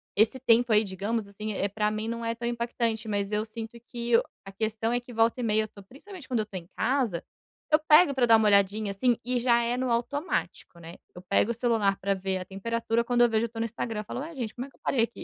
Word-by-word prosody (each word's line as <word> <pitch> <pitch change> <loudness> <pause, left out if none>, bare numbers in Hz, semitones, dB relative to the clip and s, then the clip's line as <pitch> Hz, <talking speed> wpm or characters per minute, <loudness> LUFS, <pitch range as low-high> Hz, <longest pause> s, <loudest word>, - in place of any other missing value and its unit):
esse 220 +5 +3
tempo, 235 -1 +3
aí, 215 0 +5
digamos 205 +3 -3
assim, 210 +2 -5
eh, 200 - 0
pra 210 +1 0
mim 215 +1 -3
não 230 0 -4
é 230 0 -1
tão 235 0 -4
impactante, 235 -1 -2
mas 205 -1 -1
eu 210 0 0
sinto 225 +1 -8
que 235 -1 0
o - - +1 0.2
a 195 - -8
questão 220 +2 -2
é 245 - +1
que, 245 0 -13
volta 225 +1 +2
e - - -2
meia, 220 -1 +2
eu - - -5
tô 200 - -14
principalmente 285 - -12
quando 240 -4 0
eu - - -4
tô 205 - -13
em 170 -2 -9
casa, 240 -9 0 0.5
eu 305 - +6
pego 310 0 +6
pra 255 -3 +2
dar 225 - +7
uma 220 -1 +4
olhadinha, 200 +1 +3
assim, 235 +4 +1
e 250 0 0
já 235 -1 +3
é 235 +1 0
no 255 0 -1
automático, 240 - -2
né? 170 +1 -10 0.2
Eu 180 - -9
pego 200 +4 +2
o - - +1
celular 220 -5 +1
pra 200 +1 0
ver 190 0 -2
a 185 - -6
temperatura, 230 +4 -1
quando 240 0 +1
eu 240 - +6
vejo, 225 0 +1
eu - - -6
tô 225 - -13
no 225 - 0
Instagram. 225 -1 -4
Eu - - -9
falo: 230 - -6
"Ué, 315 +4 -7
gente? 235 -5 -4
Como 250 +2 -6
é - - -16
que - - -27
eu - - -29
parei 250 - +1
aqui?" 235 - -5
230 Hz, 275 wpm, -27 LUFS, 210-240 Hz, 0.5 s, dar